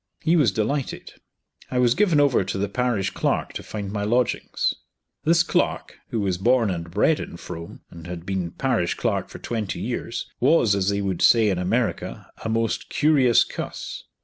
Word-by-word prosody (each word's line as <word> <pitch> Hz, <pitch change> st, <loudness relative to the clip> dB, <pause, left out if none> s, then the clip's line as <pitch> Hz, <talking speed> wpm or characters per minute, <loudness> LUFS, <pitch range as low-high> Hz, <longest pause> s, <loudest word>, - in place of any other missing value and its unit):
He 165 Hz, -, +3 dB
was 145 Hz, -, +4 dB
delighted. 125 Hz, +7 st, -2 dB, 0.6 s
I 125 Hz, -, -2 dB
was 125 Hz, -1 st, +4 dB
given 180 Hz, -5 st, +3 dB
over 140 Hz, -8 st, +4 dB
to 95 Hz, +1 st, -3 dB
the 100 Hz, +1 st, 0 dB
parish 120 Hz, -5 st, 0 dB
clerk -, -, -1 dB
to -, -, -5 dB
find 100 Hz, -2 st, -6 dB
my 105 Hz, 0 st, -2 dB
lodgings. 120 Hz, +3 st, 0 dB, 0.5 s
This 170 Hz, +2 st, +5 dB
clerk, -, -, -1 dB
who 115 Hz, -, -1 dB
was 95 Hz, -3 st, -1 dB
born 115 Hz, 0 st, +3 dB
and 85 Hz, -1 st, -4 dB
bred 105 Hz, -, +2 dB
in -, -, -7 dB
Frome, 85 Hz, 0 st, -8 dB
and 85 Hz, 0 st, -10 dB
had 85 Hz, -1 st, -7 dB
been 95 Hz, -2 st, -2 dB
parish 110 Hz, -3 st, 0 dB
clerk -, -, -1 dB
for -, -, -9 dB
twenty 110 Hz, -4 st, -3 dB
years, -, -, -3 dB
was, 125 Hz, -5 st, +4 dB
as 100 Hz, -1 st, +1 dB
they 100 Hz, 0 st, 0 dB
would 95 Hz, -3 st, -2 dB
say 115 Hz, -3 st, +5 dB
in 95 Hz, -3 st, 0 dB
America, 110 Hz, +6 st, -2 dB
a 110 Hz, -, -2 dB
most 115 Hz, 0 st, -1 dB
"curious 140 Hz, -6 st, +4 dB
cuss." -, -, -6 dB
110 Hz, 180 wpm, -24 LUFS, 95-125 Hz, 0.6 s, This